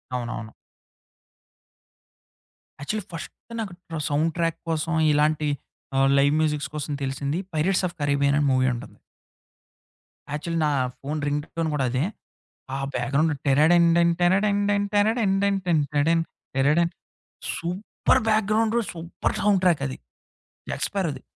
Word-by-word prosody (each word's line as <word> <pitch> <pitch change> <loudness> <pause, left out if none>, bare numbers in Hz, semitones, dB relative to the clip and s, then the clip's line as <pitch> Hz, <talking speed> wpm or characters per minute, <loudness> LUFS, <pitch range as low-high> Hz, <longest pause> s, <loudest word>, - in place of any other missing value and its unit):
అవునవును. 115 -2 -4 2.3
Actually 210 +8 -3
first 165 - -6 0.3
నాకు 195 -5 -5 0.2
ట్ర 165 - -4
sound 155 +3 +1
track 165 -1 0
కోసం 165 +1 -1 0.2
ఇలాంటి 150 +1 +2 0.5
ఆహ్, 135 0 +4
లైవ్ 140 +1 +4
మ్యూజిక్స్ 150 -3 0
కోసం 150 0 -4
తెలిసింది 140 +3 -2 0.2
'పైరేట్స్ 180 +5 +1
ఆఫ్ 170 - -16
కరేబియన్' 140 0 +2
అనే 145 - +2
మూవీ 130 0 +3
ఉంటుంది. 120 - -9 1.3
యాక్చువలీ 165 +2 -2
నా 150 - +2 0.3
ఫోను 150 +3 -3
రింగ్ 145 +1 -1
టోన్ 165 -1 0
గూడా 135 -3 +1
అదే. 130 +2 0 0.7
ఆ - - -3 0.2
బ్యాక్‌గ్రౌండ్ 140 +6 +1
'టిరడండన్, 170 +4 +5
టిరడండన్, 200 +2 +2
టిరడండన్ 205 -1 +3 0.3
టిన్ 160 -4 +3
టెడన్. 165 +3 +3 0.3
టరడం' 150 +5 +3 0.7
super 180 +5 0
background, 220 +1 +2 0.2
super 170 0 -3
sound 200 -2 +3
track 170 -6 +3
అది. 130 - -5 0.7
'జాక్ - - -2
స్పారోది.' 190 -7 -2
160 Hz, 120 wpm, -25 LUFS, 145-180 Hz, 2.3 s, టిరడండన్